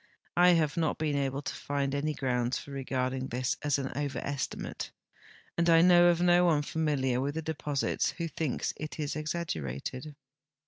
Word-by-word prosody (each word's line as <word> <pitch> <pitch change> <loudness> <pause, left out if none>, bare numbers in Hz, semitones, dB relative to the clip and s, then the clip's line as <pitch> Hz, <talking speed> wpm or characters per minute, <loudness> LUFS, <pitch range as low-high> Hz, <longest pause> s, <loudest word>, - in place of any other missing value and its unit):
I 180 0 +6
have 160 -2 +1
not 160 -2 +1
been 155 -2 0
able 140 0 -1
to - - -3
find 140 -1 -2
any 150 +2 -1
grounds 125 -1 0
for 140 - -9
regarding 130 -1 -2
this 125 0 -1
as 145 -1 +1
an 135 -1 -3
overestimate, 140 -1 -3 0.7
and 170 0 +3
I 165 0 +7
know 175 -1 +7
of 175 -1 +4
no 175 0 +5
one 155 -4 +3
familiar 145 -5 0
Avith 140 +3 -2
the 160 - -3
de])Osits 145 -3 -1
Avho 165 -2 -4
thinks 155 -6 -1
it 155 +1 -6
exaggerated. 145 - -4
145 Hz, 165 wpm, -30 LUFS, 135-160 Hz, 0.7 s, I